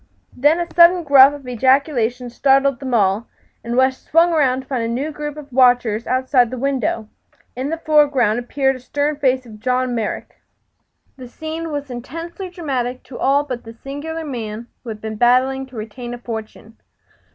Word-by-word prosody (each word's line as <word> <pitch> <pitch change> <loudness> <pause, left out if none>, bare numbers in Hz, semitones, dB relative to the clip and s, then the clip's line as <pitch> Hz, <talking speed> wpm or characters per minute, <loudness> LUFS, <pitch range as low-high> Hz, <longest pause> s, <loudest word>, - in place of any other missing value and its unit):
Then 295 +6 +3
a 345 - 0
sudden 350 0 +6
gruff 280 -1 +6
ejaculation 250 -1 +1
startled 275 +1 +2
them 260 0 -5
all, 200 +1 +1 0.4
and 235 +1 -3
West 260 0 +2
swung 335 +2 +3
around 265 -5 +2
to - - -18
find 260 -4 -2
a - - -1
new 265 +7 -2
group 295 0 -6
of 285 -3 -11
watchers 245 -3 +3
outside 255 -1 +2
the 255 - -6
window. 250 -4 -1 0.5
In 260 +3 -3
the 325 - -2
foreground 290 -8 +3
appeared 270 +2 0
the - - -13
stern 290 +3 -2
face 260 -2 +1
of 215 -2 -12
John 255 +2 0
Merrick. 225 -3 -4 0.8
The 255 -2 -9
scene 320 +5 -6
was 285 -2 -4
intensely 330 +9 -7
dramatic 260 -8 -3
to 255 - -10
all 280 +2 +3
but 250 -4 -6
the 225 - -10
singular 290 +7 -6
man 230 -5 -5 0.2
who 240 - -8
had 215 -1 -7
been 220 -1 -5
battling 260 +3 +2
to 260 - -16
retain 240 +3 -6
a - - -9
fortune. 220 -1 -8
260 Hz, 175 wpm, -19 LUFS, 240-290 Hz, 0.8 s, sudden